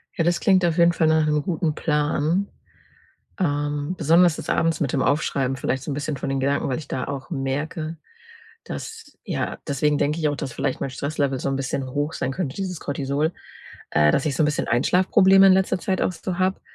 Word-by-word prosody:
Ja, 165 Hz, -, +1 dB
das 175 Hz, +1 st, +1 dB
klingt 190 Hz, -2 st, +3 dB
auf 170 Hz, -1 st, 0 dB
jeden 170 Hz, 0 st, +5 dB
Fall 160 Hz, -1 st, +2 dB
nach 160 Hz, 0 st, +3 dB
'nem 150 Hz, -1 st, +1 dB
guten 160 Hz, 0 st, -1 dB
Plan, 155 Hz, +5 st, 0 dB, 0.9 s
ähm, 145 Hz, -1 st, -1 dB
besonders 165 Hz, +1 st, +4 dB
das -, -, -7 dB
Abends 165 Hz, -1 st, +1 dB
mit 140 Hz, -4 st, 0 dB
dem 135 Hz, -, +1 dB
Aufschreiben 140 Hz, -2 st, 0 dB
vielleicht 130 Hz, +1 st, -2 dB
so -, -, -6 dB
'n -, -, -2 dB
bisschen 145 Hz, +1 st, -3 dB
von 135 Hz, -, -4 dB
den 135 Hz, 0 st, -1 dB
Gedanken, 140 Hz, +1 st, 0 dB
weil 130 Hz, -, -1 dB
ich 150 Hz, -3 st, -8 dB
da 130 Hz, -, -3 dB
auch 140 Hz, +4 st, -6 dB
merke, 155 Hz, +3 st, -3 dB, 0.7 s
dass 450 Hz, 0 st, -8 dB
ja -, -, -3 dB
deswegen 145 Hz, +1 st, +1 dB
denke 150 Hz, +3 st, 0 dB
ich 155 Hz, -2 st, +1 dB
auch, 145 Hz, -, -2 dB
dass 130 Hz, -, -5 dB
vielleicht 130 Hz, -, -2 dB
mein 135 Hz, -, -2 dB
Stresslevel 140 Hz, -1 st, -2 dB
so -, -, -2 dB
'n 135 Hz, -, -1 dB
bisschen 135 Hz, 0 st, -3 dB
hoch 145 Hz, +3 st, -2 dB
sein 130 Hz, -, -2 dB
könnte 145 Hz, -4 st, -3 dB
dieses 185 Hz, -3 st, -4 dB
Cortisol 140 Hz, +3 st, -1 dB, 0.6 s
äh, 75 Hz, -1 st, +4 dB
dass 140 Hz, -, +1 dB
ich 140 Hz, -, -1 dB
so -, -, +2 dB
'n 150 Hz, -, +3 dB
bisschen 150 Hz, -, -1 dB
Einschlafprobleme 190 Hz, -, +5 dB
in 190 Hz, -, +7 dB
letzter 190 Hz, -1 st, +1 dB
Zeit 190 Hz, -1 st, -1 dB
auch -, -, +1 dB
so 180 Hz, +1 st, -5 dB
habe, 185 Hz, +1 st, 0 dB
150 Hz, 215 wpm, -23 LUFS, 140-170 Hz, 0.9 s, in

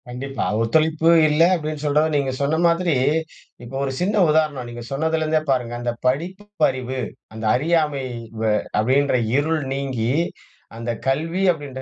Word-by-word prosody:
கண்டிப்பா. 135 Hz, +3 st, -4 dB, 0.2 s
ஒத்துழைப்பு 160 Hz, +7 st, +2 dB, 0.2 s
இல்ல 150 Hz, +2 st, +2 dB
அப்டீன்னு 155 Hz, -2 st, -4 dB
சொல்ற 145 Hz, +1 st, +3 dB
நீங்க 140 Hz, -2 st, +1 dB
சொன்ன 140 Hz, +3 st, +1 dB
மாதிரி, 170 Hz, -1 st, +1 dB, 0.7 s
இப்போ 120 Hz, +3 st, -9 dB
ஒரு 135 Hz, -, -1 dB
சின்ன 200 Hz, +3 st, +1 dB
உதாரணம் 150 Hz, -5 st, +1 dB
நீங்க 120 Hz, 0 st, -8 dB
சொன்னதுலேருந்தே 155 Hz, +2 st, 0 dB
பாருங்க, 125 Hz, -3 st, 0 dB
அந்த 120 Hz, 0 st, -1 dB
படிப்பறிவு, 140 Hz, -4 st, -1 dB, 0.3 s
அந்த 110 Hz, 0 st, -6 dB
அறியாமை 150 Hz, -1 st, +1 dB, 0.4 s
வ -, -, -1 dB, 0.4 s
அப்படீன்ற 130 Hz, +4 st, +2 dB, 0.2 s
இருள் 155 Hz, +2 st, +1 dB
நீங்கி 130 Hz, -4 st, -2 dB, 0.6 s
அந்த 115 Hz, +1 st, -3 dB, 0.2 s
கல்வி 165 Hz, +7 st, 0 dB
அப்டீன்ற 145 Hz, -5 st, -7 dB
145 Hz, 130 wpm, -22 LUFS, 130-160 Hz, 0.7 s, சொல்ற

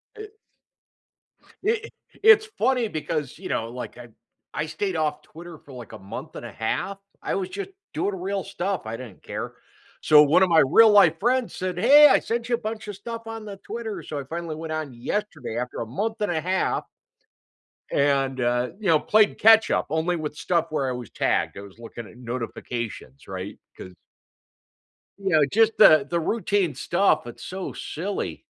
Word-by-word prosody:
It 430 Hz, 0 st, -10 dB, 1.3 s
it 440 Hz, +2 st, -1 dB, 0.3 s
it's 435 Hz, -1 st, +7 dB
funny 250 Hz, -3 st, +2 dB
because, 155 Hz, -5 st, -4 dB
you -, -, -8 dB
know, 115 Hz, 0 st, -2 dB
like, 125 Hz, +1 st, -8 dB
I 120 Hz, -1 st, -10 dB, 0.5 s
I 150 Hz, +2 st, -2 dB
stayed 190 Hz, +3 st, -3 dB
off 155 Hz, -2 st, -1 dB
Twitter 170 Hz, +1 st, -12 dB
for, 140 Hz, -, -15 dB
like, 120 Hz, -4 st, -10 dB
a -, -, -9 dB
month 95 Hz, +1 st, -8 dB
and -, -, -7 dB
a -, -, -8 dB
half- 195 Hz, -, -3 dB, 0.3 s
I -, -, -1 dB
was 190 Hz, -2 st, -2 dB
just 400 Hz, -1 st, -6 dB, 0.2 s
doing 200 Hz, -1 st, -1 dB
real 195 Hz, +1 st, -3 dB
stuff, 195 Hz, 0 st, -3 dB
I 110 Hz, +1 st, -5 dB
didn't 120 Hz, -6 st, -11 dB
care- -, -, -5 dB, 0.5 s
so, 150 Hz, -1 st, +7 dB
one 165 Hz, +6 st, +4 dB
of -, -, +4 dB
my 165 Hz, -1 st, +5 dB
real-life 200 Hz, -1 st, +6 dB
friends 245 Hz, +2 st, +1 dB
said, 185 Hz, -1 st, -4 dB
"Hey, 285 Hz, +9 st, +8 dB
I 275 Hz, -, +5 dB
sent 235 Hz, 0 st, -3 dB
you 240 Hz, -, +2 dB
a -, -, -5 dB
bunch 220 Hz, -1 st, -6 dB
of 205 Hz, -, -5 dB
stuff 230 Hz, +3 st, -7 dB
on 225 Hz, -1 st, -6 dB
the 205 Hz, -2 st, -8 dB
Twitter," 220 Hz, +2 st, -6 dB
so, 150 Hz, -, -6 dB
I 140 Hz, -, -5 dB
finally 165 Hz, +2 st, -5 dB
went 160 Hz, 0 st, -6 dB
on 155 Hz, -5 st, -4 dB
yesterday 140 Hz, -, -4 dB
after 125 Hz, 0 st, -4 dB
a -, -, -3 dB
month 215 Hz, -, -3 dB
and 205 Hz, -, 0 dB
a 160 Hz, -, 0 dB
half 185 Hz, +2 st, 0 dB, 1.1 s
and, 135 Hz, -2 st, +1 dB
uh, 120 Hz, +1 st, +1 dB
you 205 Hz, -, -3 dB
know, 160 Hz, -2 st, +5 dB
played 215 Hz, +4 st, +3 dB
catch-up 220 Hz, 0 st, +5 dB
only 160 Hz, +3 st, 0 dB
with 150 Hz, -2 st, -4 dB
stuff 165 Hz, +2 st, 0 dB
where 140 Hz, -4 st, -1 dB
I -, -, -1 dB
was 125 Hz, -3 st, -6 dB
tagged, -, -, 0 dB
I 100 Hz, -, -6 dB
was 100 Hz, +2 st, -14 dB
looking 115 Hz, -1 st, -9 dB
at -, -, -16 dB
notifications, 115 Hz, -, -6 dB
right? 95 Hz, +1 st, -6 dB, 0.2 s
'Cause 90 Hz, -, -10 dB, 1.3 s
you 195 Hz, -, -5 dB
know, 155 Hz, -4 st, +4 dB
just 220 Hz, +8 st, +3 dB
the 155 Hz, -8 st, +7 dB
the 170 Hz, -, 0 dB
routine 200 Hz, -3 st, 0 dB
stuff, 175 Hz, -3 st, +1 dB
it's 120 Hz, -, -10 dB
so 190 Hz, 0 st, -6 dB
silly. 190 Hz, +6 st, -5 dB
170 Hz, 185 wpm, -24 LUFS, 135-210 Hz, 1.3 s, Hey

